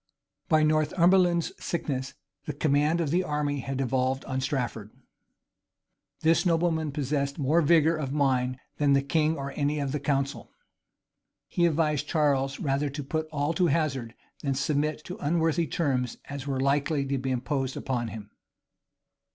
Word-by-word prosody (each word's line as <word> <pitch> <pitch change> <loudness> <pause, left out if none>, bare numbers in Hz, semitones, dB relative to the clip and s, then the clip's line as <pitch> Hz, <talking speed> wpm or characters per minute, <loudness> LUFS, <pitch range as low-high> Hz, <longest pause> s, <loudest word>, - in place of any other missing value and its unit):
By 155 -1 +4
Northumberland's 170 +3 +3
sickness, 135 -6 -3 0.3
the 150 - -3
command 150 +3 +2
of 150 -4 -1
the 180 +3 +2
army 150 -3 -1
had 135 +1 -4
devolved 130 0 0
on 130 0 -2
Strafford. 125 -6 -2 1.3
This 165 +1 +3
nobleman 165 -3 +1
possessed 140 0 -1
more 155 +3 +3
vigor 160 +1 +4
of 140 -4 -3
mind 130 -3 +1 0.2
than 145 -1 +3
the 140 0 +3
king 155 +2 +1
or 140 0 -4
any 145 +2 -1
of 140 -2 -2
the 150 - -1
council. 140 0 -1 1.0
He 170 -1 +2
advised 150 -2 0
Charles 140 -3 +1
rather 140 +1 0
to 145 +1 -5
put 155 +3 -2
all 150 +1 0
to 175 +2 +2
hazard, 135 -7 -1 0.3
than 140 -2 -1
submit 150 +2 0
to 180 - -6
unworthy 165 +1 +1
terms 130 -7 -1
as 140 -1 -7
were 135 -2 -1
likely 140 +1 +1
to 135 0 -1
be 130 +1 -3
imposed 130 +1 -2
upon 120 -3 -2
him. 105 -2 -8
145 Hz, 150 wpm, -27 LUFS, 135-155 Hz, 1.3 s, By